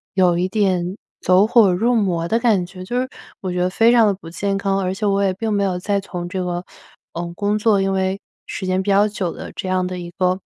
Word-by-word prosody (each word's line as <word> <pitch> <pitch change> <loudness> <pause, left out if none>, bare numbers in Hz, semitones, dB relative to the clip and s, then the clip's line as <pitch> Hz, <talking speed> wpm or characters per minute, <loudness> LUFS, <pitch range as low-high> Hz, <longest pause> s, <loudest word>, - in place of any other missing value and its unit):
有 180 -2 +3
一 180 - +1
点 190 -3 0 0.2
走 185 +3 +4
火 220 -6 +5
入 235 +6 +2
魔 175 -6 0
的 230 +6 +1
感 215 -7 +2
觉。 185 +1 -10
就 245 +5 -1
是 260 - -4 0.3
我 185 -2 -3
觉 180 - -2
得 180 - +2
非 225 +5 +4
常 235 -2 +5
地 200 - +2
不 175 -4 -11
健 195 +3 -2
康， 195 -1 0
而 185 -1 -1
且 210 +2 -3
我 200 0 +2
也 190 - +2
并 220 +3 -3
没 200 - +1
有 185 -2 -1
在 200 +1 0
从 175 -2 -6
这 185 0 -3
个， 175 0 -3 0.5
呃， 170 0 -5
工 205 +1 0
作 210 -2 +3
因 195 - 0
为 190 +1 0 0.3
时 190 - -5
间 185 +1 +1
比 205 - -3
较 200 +2 +4
久 195 -5 -3
的 - - -8
这 190 - -5
样 185 0 +1
的 185 - -5
一 175 0 -7
个， 185 0 +1
190 Hz, 275 characters per minute, -20 LUFS, 180-205 Hz, 0.5 s, 火